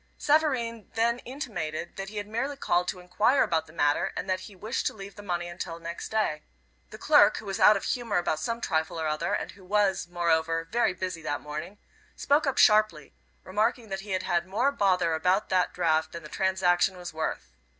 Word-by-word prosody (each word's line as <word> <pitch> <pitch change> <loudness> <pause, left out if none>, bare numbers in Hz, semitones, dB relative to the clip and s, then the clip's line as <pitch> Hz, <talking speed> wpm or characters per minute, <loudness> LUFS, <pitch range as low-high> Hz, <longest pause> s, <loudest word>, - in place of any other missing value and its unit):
Savareen 255 -8 +1
then 235 +2 +2
intimated 215 - -5
that 195 0 -5
he 210 - -9
had 205 - -3
merely 250 +7 -3
called 180 -8 +1
to 185 - -3
enquire 205 +9 +2
about 165 -1 0
the - - -14
matter, 150 +3 +1
and - - -3
that 185 0 0
he 195 +2 -11
wished 215 +7 -2
to - - -3
leave 200 -1 -9
the 205 - -11
money 175 -3 -3
until 175 -1 -6
next 170 0 -6
day. 210 -9 0 0.5
The - - -10
clerk, - - +5
who - - -8
was 195 -1 -4
out 210 - +7
of - - -7
humor 235 -5 -1
about 175 -3 0
some 230 +7 -3
trifle 160 -3 -1
or 160 - -2
other, 155 +3 -1
and - - -4
who 195 0 -17
was, 200 -1 +1
moreover, 165 -1 +1
very 195 0 +1
busy 180 -3 -4
that 145 -2 -2
morning, 155 +7 -7 0.4
spoke 290 +1 +2
up 270 - 0
sharply, 210 -8 +4 0.3
remarking 220 +4 -1
that 195 0 -3
he 205 +2 -10
had 185 - -1
had 175 -1 0
more 240 +9 +1
bother 180 -8 +2
about 180 +6 +1
that 185 -1 +2
draft 160 -2 +1
than 170 -1 -7
the 150 - -10
transaction 190 0 +1
was 175 -2 -7
worth. 155 - -4
185 Hz, 210 wpm, -27 LUFS, 170-215 Hz, 0.5 s, out